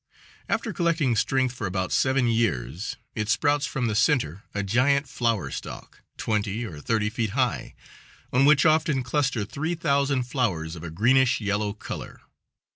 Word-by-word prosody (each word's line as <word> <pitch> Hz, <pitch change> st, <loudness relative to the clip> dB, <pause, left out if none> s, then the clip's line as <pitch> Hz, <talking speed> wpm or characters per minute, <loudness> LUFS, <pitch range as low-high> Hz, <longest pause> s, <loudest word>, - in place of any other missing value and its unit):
After 225 Hz, -1 st, -1 dB
collecting 165 Hz, -9 st, +1 dB
strength 130 Hz, +3 st, +1 dB
for 110 Hz, -5 st, -4 dB
about 95 Hz, 0 st, -2 dB
seven 130 Hz, -1 st, +2 dB
years 95 Hz, -, -1 dB, 0.2 s
it 105 Hz, -1 st, -3 dB
sprouts 145 Hz, +4 st, +2 dB
from 130 Hz, -2 st, -2 dB
the 110 Hz, -, 0 dB
center 105 Hz, -, +1 dB
a 100 Hz, -, -2 dB
giant 140 Hz, +8 st, +2 dB
flower 115 Hz, -5 st, -1 dB
stalk, -, -, -8 dB, 0.2 s
twenty 105 Hz, +1 st, -1 dB
or 80 Hz, -9 st, -8 dB
thirty 105 Hz, +4 st, 0 dB
feet 110 Hz, -1 st, -1 dB
high, -, -, -1 dB, 0.6 s
on 130 Hz, +2 st, +4 dB
which 150 Hz, +1 st, +5 dB
often 155 Hz, -4 st, +3 dB
cluster 125 Hz, -4 st, 0 dB
three 155 Hz, -, -3 dB
thousand 140 Hz, -4 st, +1 dB
flowers 100 Hz, -, -2 dB
of 80 Hz, -, -9 dB
a 85 Hz, -, -5 dB
greenish 125 Hz, +9 st, +3 dB
yellow 100 Hz, -1 st, -1 dB
color. 105 Hz, -, -8 dB
120 Hz, 155 wpm, -25 LUFS, 105-140 Hz, 0.6 s, which